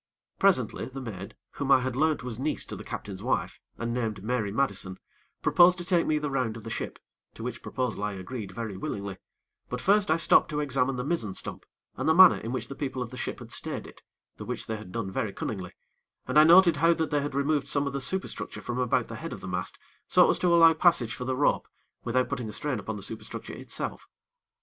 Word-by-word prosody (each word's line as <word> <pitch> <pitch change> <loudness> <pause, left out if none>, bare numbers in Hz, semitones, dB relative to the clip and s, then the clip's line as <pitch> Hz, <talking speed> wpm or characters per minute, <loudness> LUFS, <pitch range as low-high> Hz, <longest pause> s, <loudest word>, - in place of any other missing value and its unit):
Presently, 175 - +2
the 135 +1 -7
maid, 100 -7 -7 0.2
whom 140 -1 -2
I 130 -1 +7
had 130 -1 -2
learnt 155 0 +1
was 125 -2 -5
niece 150 +3 -1
to - - -7
the - - -8
captain's 95 -2 -6
wife, - - -1 0.2
and 115 0 -2
named 110 -5 -2
Mary 110 -3 -1
Madison, 100 -6 -1 0.5
proposed 180 +1 +6
to 175 - -6
take 175 -2 +2
me 155 - +2
the 150 -1 -2
round 125 -4 -1
of 115 - -11
the 115 - -6
ship, - - -4 0.4
to 115 - -8
which 120 -1 -5
proposal 125 -6 -3
I 105 -1 -1
agreed 100 +2 -6
very 110 -1 -5
willingly; 100 0 -5 0.5
but 125 - -3
first 200 +6 +3
I 160 - +4
stopped 165 - +5
to 150 -2 -2
examine 135 -2 +1
the 125 - -3
mizzen 135 - -1
stump, - - -6 0.3
and - - 0
the 160 - +5
manner 185 -1 +8
in 115 - -5
which 125 -3 -3
the - - -6
people 130 -3 -3
of 115 - -9
the - - -8
ship - - -4
had - - -11
stayed - - -3
it, - - -14 0.4
the - - -7
which - - -4
they 110 - -3
had 105 -4 -10
done 100 -2 -3
very 100 +1 -2
cunningly, 95 -3 -5 0.5
and 150 - +4
I 155 - +8
noted 170 -1 +7
how 165 +3 +5
that 160 -1 -2
they 145 -1 +2
had 140 -1 -4
removed 140 0 +1
some 145 0 +1
of 140 - -3
the 140 - -2
superstructure 190 +9 -3
from 120 +1 -3
about 125 -2 +1
the - - -7
head - - -6
of - - -9
the - - -7
mast, - - -4 0.3
so - - +6
as - - -1
to 180 - +1
allow 165 -1 +7
passage 155 -9 +3
for 125 - -5
the 130 0 -1
rope, 145 - +2 0.4
without 125 +2 +1
putting 125 -5 -4
a - - -7
strain 145 -6 -2
upon 110 +2 -5
the 100 - -7
superstructure 110 - -6
itself. - - -4
130 Hz, 235 wpm, -28 LUFS, 110-150 Hz, 0.5 s, manner